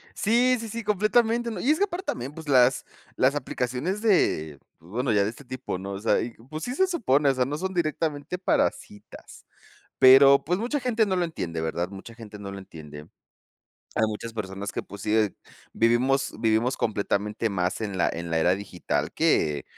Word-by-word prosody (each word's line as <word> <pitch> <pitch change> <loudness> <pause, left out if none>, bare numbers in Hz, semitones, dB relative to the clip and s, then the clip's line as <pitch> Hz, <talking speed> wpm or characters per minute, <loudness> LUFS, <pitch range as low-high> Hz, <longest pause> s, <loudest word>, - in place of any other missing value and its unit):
Sí, 245 +4 +3
sí, 225 -1 -6
sí, 230 +2 -5
completamente, 225 +3 +2
¿no?, 210 -5 -5
y 265 - +1
es 310 - +3
que 405 - +3
aparte 375 -1 -5
también 125 +4 -4
pues 160 -2 -10
las 130 -1 +4 0.3
las 130 +2 +3
aplicaciones 130 - -3
de 80 - +1 0.2
bueno, 115 - -2
ya 100 -1 +3
de 105 - -1
este 140 - -14
tipo, 130 -6 -5
¿no?, 100 +1 -6
o 100 - -4
sea, 110 - +2
y 120 - -3 0.2
pues 155 +1 -5
sí, 250 - -4
se 380 +5 +3
supone, 150 - +2
o 135 - +3
sea, 130 -1 +1
no 145 +3 -4
son 190 +2 -3
directamente 155 0 -2
para 185 - +2
citas, 105 - -14 0.5
pero 135 +1 +7
pues 180 +5 0
mucha 250 +6 -2
gente 230 -3 +1
no 190 - 0
lo 180 - +1
entiende, 85 - -4
¿verdad?, 85 +2 -2
mucha 100 +4 -10
gente 110 -2 -11
no 100 -1 -7
lo 100 - -7
entiende 75 -5 -11 0.9
hay - - +2
muchas 110 +2 -6
personas 100 -2 -5
que - - -3
pues 100 0 -11
sí, 110 0 0
eh, 110 -3 +2 0.4
vivimos 125 +4 +2
vivimos 115 +3 +1
completamente 105 +1 -1
más 95 0 -2
en 100 -3 -3
la 90 - +2
en 85 0 -5
la 80 - +1
era 90 +3 +3
digital 100 -3 -3
que 75 -2 +1
125 Hz, 200 wpm, -25 LUFS, -, 0.9 s, pero